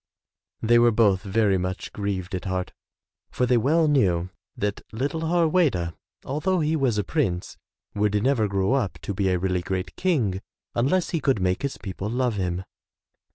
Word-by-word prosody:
'' -, -, -57 dB
They 120 Hz, +1 st, +5 dB
were 120 Hz, 0 st, +6 dB
both 105 Hz, -4 st, +3 dB
very 100 Hz, -1 st, +2 dB
much 90 Hz, +1 st, -4 dB
grieved 100 Hz, -2 st, -3 dB
at 95 Hz, +2 st, -3 dB
heart 95 Hz, -1 st, -2 dB, 0.6 s
for 125 Hz, -, 0 dB
they 125 Hz, 0 st, +3 dB
well 155 Hz, +7 st, +3 dB
knew 95 Hz, -, +2 dB, 0.3 s
that 105 Hz, 0 st, -2 dB
little 140 Hz, +8 st, -2 dB
Harweda, 160 Hz, -, +2 dB, 0.3 s
although 175 Hz, +7 st, 0 dB
he 155 Hz, 0 st, +1 dB
was 130 Hz, -7 st, +1 dB
a 105 Hz, -, +1 dB
prince, 95 Hz, -, -1 dB, 0.4 s
would 105 Hz, 0 st, +1 dB
never 125 Hz, -5 st, +2 dB
grow 100 Hz, +3 st, +1 dB
up 125 Hz, -9 st, 0 dB
to 100 Hz, -, -3 dB
be 95 Hz, 0 st, 0 dB
a 90 Hz, -, +2 dB
really 90 Hz, 0 st, 0 dB
great 95 Hz, 0 st, -4 dB
King 120 Hz, -, 0 dB, 0.3 s
unless 145 Hz, +10 st, +1 dB
he 165 Hz, -, 0 dB
could 135 Hz, -7 st, +2 dB
make 90 Hz, 0 st, 0 dB
his 140 Hz, -1 st, -3 dB
people 95 Hz, +1 st, -5 dB
love 125 Hz, 0 st, 0 dB
him. 90 Hz, -2 st, -2 dB
105 Hz, 175 wpm, -25 LUFS, 95-135 Hz, 0.6 s, were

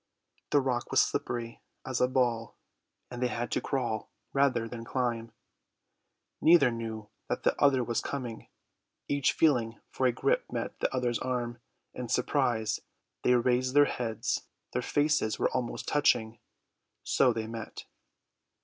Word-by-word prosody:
The 145 Hz, -, +4 dB
rock 125 Hz, -2 st, -1 dB
was -, -, +3 dB
slippery 115 Hz, -1 st, -1 dB, 0.2 s
as 130 Hz, -2 st, -2 dB
a 125 Hz, -, +5 dB
ball, 120 Hz, -3 st, 0 dB, 0.5 s
and 120 Hz, 0 st, -6 dB
they 125 Hz, -, +3 dB
had 120 Hz, 0 st, -3 dB
to -, -, 0 dB
crawl 120 Hz, -6 st, -2 dB, 0.2 s
rather 135 Hz, -5 st, +2 dB
than 115 Hz, 0 st, -7 dB
climb. 115 Hz, -2 st, -2 dB, 1.1 s
Neither 160 Hz, -6 st, +6 dB
knew 110 Hz, -2 st, -5 dB, 0.2 s
that -, -, -2 dB
the -, -, +3 dB
other 135 Hz, -3 st, +5 dB
was 120 Hz, -1 st, -1 dB
coming. 125 Hz, -5 st, -5 dB, 0.6 s
Each 140 Hz, -2 st, +2 dB
feeling 120 Hz, -8 st, +2 dB
for 130 Hz, -, +1 dB
a -, -, +3 dB
grip -, -, 0 dB
met -, -, -4 dB
the -, -, 0 dB
other's 125 Hz, -2 st, 0 dB
arm: 120 Hz, -2 st, -2 dB, 0.3 s
in 125 Hz, -2 st, -6 dB
surprise 125 Hz, -4 st, +1 dB, 0.4 s
they 125 Hz, -, +4 dB
raised 125 Hz, +2 st, +2 dB
their 145 Hz, 0 st, +8 dB
heads; 115 Hz, -5 st, -2 dB, 0.3 s
their -, -, 0 dB
faces 145 Hz, -7 st, +1 dB
were -, -, +1 dB
almost 125 Hz, -2 st, -3 dB
touching; 115 Hz, -6 st, +2 dB, 0.6 s
so -, -, +3 dB
they 110 Hz, -1 st, -3 dB
met. 115 Hz, 0 st, -7 dB
125 Hz, 145 wpm, -30 LUFS, 115-130 Hz, 1.1 s, their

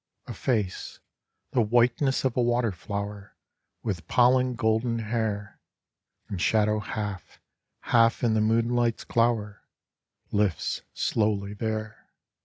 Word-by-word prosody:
A -, -, -6 dB
face, 105 Hz, -8 st, -2 dB, 0.5 s
the 125 Hz, -, +3 dB
whiteness 120 Hz, +4 st, +2 dB
of 130 Hz, -, +1 dB
a 125 Hz, -, +2 dB
water 120 Hz, -1 st, +2 dB
flower, 100 Hz, +3 st, -6 dB, 0.5 s
With 90 Hz, -7 st, -3 dB
pollen 125 Hz, +2 st, +3 dB
golden 115 Hz, +1 st, +1 dB
hair, 110 Hz, -2 st, -3 dB, 0.7 s
In 95 Hz, -, -5 dB
shadow 105 Hz, +2 st, +2 dB
half, 105 Hz, -3 st, -5 dB, 0.4 s
half 115 Hz, 0 st, +3 dB
in 115 Hz, -2 st, +3 dB
the 110 Hz, -, +2 dB
moonlight's 115 Hz, +1 st, +1 dB
glower, 115 Hz, -3 st, 0 dB, 0.7 s
Lifts 100 Hz, -5 st, 0 dB
slowly 105 Hz, -2 st, 0 dB
there. 110 Hz, +1 st, -4 dB
110 Hz, 110 wpm, -27 LUFS, 105-120 Hz, 0.7 s, the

